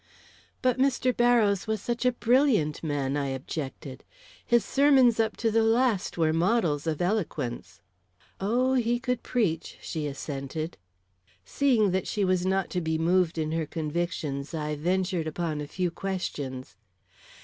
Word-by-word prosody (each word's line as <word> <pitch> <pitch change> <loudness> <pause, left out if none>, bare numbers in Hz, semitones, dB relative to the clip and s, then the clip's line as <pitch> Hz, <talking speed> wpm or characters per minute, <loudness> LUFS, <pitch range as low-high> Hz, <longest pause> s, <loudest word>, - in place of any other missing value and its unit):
"But 255 0 +2
Mr. 260 -2 +2
Barrows 230 -5 +3
was 220 -1 -1
such 240 +4 -3
a - - +4
brilliant 240 - +2
man," 145 -3 -1
I 145 -1 -1
objected. 135 0 -6 0.4
"His 235 -1 +2
sermons 270 -5 +4
up 220 -1 +1
to 225 -1 0
the 225 +1 +3
last 225 -4 +1
were 160 -2 +2
models 170 -4 +1
of 160 +1 -1
eloquence." 120 - -3 0.6
"Oh, 245 +6 +1
he 240 -1 +1
could 250 -1 -2
preach," 185 -10 -1
she 155 -2 -4
assented. 145 +2 -5 0.7
Seeing 240 -8 +2
that 190 +1 -1
she 205 -2 0
was 185 0 +1
not 190 0 0
to 180 - -1
be 160 -1 -1
moved 170 +1 +2
in 155 -1 -1
her 160 -1 -1
convictions, 155 -2 -3
I 150 -1 -2
ventured 180 +1 -1
upon 155 -1 -3
a 145 - -5
few 180 +2 -2
questions. 145 - -5
180 Hz, 150 wpm, -27 LUFS, 155-230 Hz, 0.7 s, a